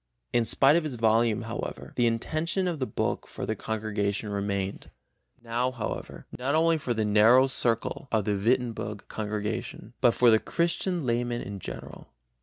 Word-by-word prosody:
In 120 -1 +3
spite 135 +6 +5
of 170 - +2
its 150 -5 -4
volume, 115 0 +2
however, 115 +1 -6
the 120 -1 +3
intention 155 +10 -1
of 170 -4 -2
the 130 - -1
book - - -2
for - - -6
the - - -2
congregation 105 -1 -2
remained, 100 -1 -3 0.5
now 120 +2 0
however, 125 -4 -6
not 135 +4 0
only 165 0 +3
for 125 -4 -2
the 110 -1 0
narrow 110 +5 +6
circle 120 0 0
of 110 -3 +1
the 105 - +1
Wittenberg 115 -1 -1
congregation, 110 +1 -4
but 120 -3 +4
for 120 -2 +5
the 110 - +5
Christian 170 - -1
layman 120 0 -1
in 100 0 -6
general. - - -8
115 Hz, 165 wpm, -27 LUFS, 110-130 Hz, 0.5 s, narrow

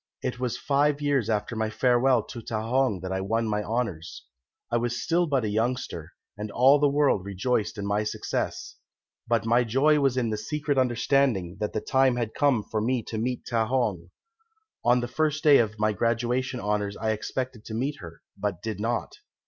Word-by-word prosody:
It 125 -1 -3
was 125 -3 -2
five 145 +1 +1
years 140 -6 +1
after 105 +1 -1
my 110 0 -1
farewell 125 +1 +3
to 120 - -8
Ta 115 -1 -3
hong 125 -6 +1
that 95 0 -5
I 95 0 -1
won 115 +4 0
my 105 -1 0
honours. 105 -8 -3 0.5
I 120 - +2
was 120 0 -1
still 170 +1 +1
but 135 -5 +1
a - - 0
youngster, 110 -6 -2 0.2
and 105 +1 -5
all 130 +7 +5
the 145 0 +4
world 140 -9 +2
rejoiced 100 +4 -1
in 100 - -4
my 105 +1 0
success. 105 - -3 0.5
But 115 -1 +1
my 120 +2 +3
joy 135 +6 +3
was 135 -2 +1
in 120 -3 0
the 110 - -1
secret 145 +5 -1
understanding 120 -7 +1
that 105 - -2
the - - -1
time 130 -2 +3
had 120 -3 -2
come 140 -7 +2
for 110 +1 -3
me 120 +1 0
to 110 - -3
meet 125 +2 -2
Ta 115 -2 +1
hong. 105 -9 -1 0.7
On 120 +1 +4
the 120 - -3
first 155 +4 -1
day 145 -3 +7
of 110 -2 0
my 110 0 +1
graduation 120 +4 0
honours 105 -1 -1
I 110 0 -1
expected 125 +2 -4
to 110 - -6
meet 140 +5 -2
her, 85 -2 -11
but 100 -4 -3
did 110 -2 -4
not. 115 +2 -2
120 Hz, 195 wpm, -26 LUFS, 105-130 Hz, 0.7 s, day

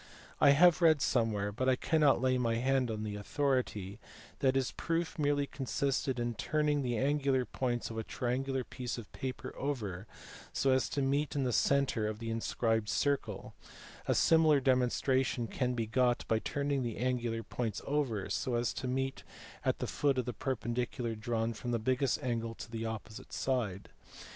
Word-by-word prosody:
I - - +7
have 175 +1 +6
read 160 -3 +6
somewhere, 110 -6 +1
but 130 +5 0
I 130 - +4
cannot 150 0 +3
lay 130 0 +2
my 115 -2 +1
hand 130 +1 +1
on 110 -1 -3
the 105 -1 -4
authority, 105 -4 -1 0.4
that 135 -1 +2
his 135 -2 +1
proof 165 -1 -2
merely 145 -1 +2
consisted 135 -1 -1
in 120 0 -1
turning 150 +5 0
the 120 -3 -1
angular 135 -1 +1
points 120 -2 -2
of 115 - -4
a - - -2
triangular 130 +3 -2
piece 125 0 -5
of 115 - -9
paper 130 -2 -5
over 110 -9 -3 0.4
so 135 - +2
as 130 -1 +2
to 140 - -1
meet 140 +3 0
in 140 - +1
the 125 -2 0
centre 130 -3 +2
of 110 0 -3
the 115 0 -4
inscribed 115 -1 0
circle: 140 +4 -1 0.5
a - - +2
similar 160 -3 +5
demon 130 -2 +3
stration 130 -2 0
can 125 0 -1
be 115 -2 -1
got 120 +2 +1
by 110 - +2
turning 140 +2 -1
the 120 -3 -3
angular 120 -2 -1
points 110 -1 -3
over 135 -9 -1
so 125 - -1
as 120 0 0
to 130 - -4
meet 135 +1 -2 0.4
at - - +1
the - - -3
foot 140 -2 +1
of 125 - 0
the 125 - -3
perpendicular 120 -1 -2
drawn 115 +1 -1
from 120 +2 -6
the 120 - +1
biggest 130 +3 +1
angle 115 -2 -2
to 115 - -9
the 115 0 -3
opposite 110 0 -7
side. 115 -8 -2
125 Hz, 180 wpm, -32 LUFS, 115-135 Hz, 0.5 s, I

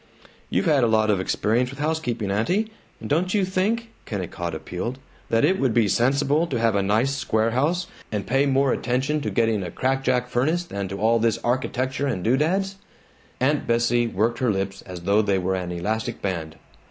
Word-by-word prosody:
"You've - - 0
had 150 -6 +4
a - - +4
lot 110 -1 +3
of 100 - +1
experience 115 +6 +1
with 135 - -9
housekeeping, 145 -9 -1
aunty, 185 - 0 0.3
and - - -7
don't 180 +7 +1
you 200 -2 +3
think," 215 +5 -1 0.2
Kennicott 85 -4 -4
appealed, 90 +10 -4 0.3
"that 115 +4 +3
it 190 +5 +2
would 125 -4 +1
be 115 -3 +4
sensible 140 - +2
to 135 - -2
have 115 -1 +2
a 100 - +2
nice 110 +7 +2
square 115 -4 0
house, 160 +9 +1 0.3
and 105 -3 -2
pay 135 +2 +2
more 135 -1 +3
attention 135 +5 0
to - - -2
getting 115 -3 +1
a 90 - -4
crackajack 130 +3 0
furnace 150 +8 +1
than 100 - -4
to 100 +1 -5
all 115 +2 +3
this 115 0 +2
architecture 130 +2 -1
and 95 -10 -2
doodads?" 175 - +1 0.6
Aunt 145 +3 +1
Bessie 120 0 +2
worked 115 +3 0
her 125 - +1
lips 95 -1 -2
as 90 -2 -7
though 100 +4 +3
they 100 -2 +1
were 95 +1 0
an 90 -2 -3
elastic 105 +6 -2
band. 80 -5 -3
120 Hz, 190 wpm, -24 LUFS, 105-140 Hz, 0.6 s, had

